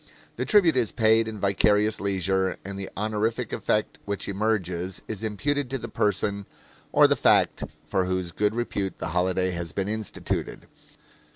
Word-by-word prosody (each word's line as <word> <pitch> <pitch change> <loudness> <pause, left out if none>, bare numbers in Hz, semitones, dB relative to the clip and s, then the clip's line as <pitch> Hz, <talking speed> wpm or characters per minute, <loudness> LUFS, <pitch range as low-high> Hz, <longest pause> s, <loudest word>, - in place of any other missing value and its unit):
The - - -2
tribute 185 -8 +4
is 120 -4 +2
paid 110 -1 +3
in 110 -1 -6
vicarious 105 +2 +2
leisure, 95 -1 0
and 100 0 -6
the 95 - -5
honorific 110 +3 -1
effect 105 - -1
which 100 -1 -3
emerges 95 -3 -1
is 110 -3 -4
imputed 125 +6 -1
to 135 - -2
the 115 -2 -6
person 100 -1 -1 0.4
or - - +6
the - - +2
fact - - +3 0.2
for 95 +3 0
whose 90 -1 -2
good 105 +4 0
repute 100 -5 -2
the 85 - -4
holiday 90 +2 +1
has 85 -2 -4
been 95 +3 -1
instituted. 110 -1 -3
100 Hz, 160 wpm, -26 LUFS, 95-110 Hz, 0.4 s, or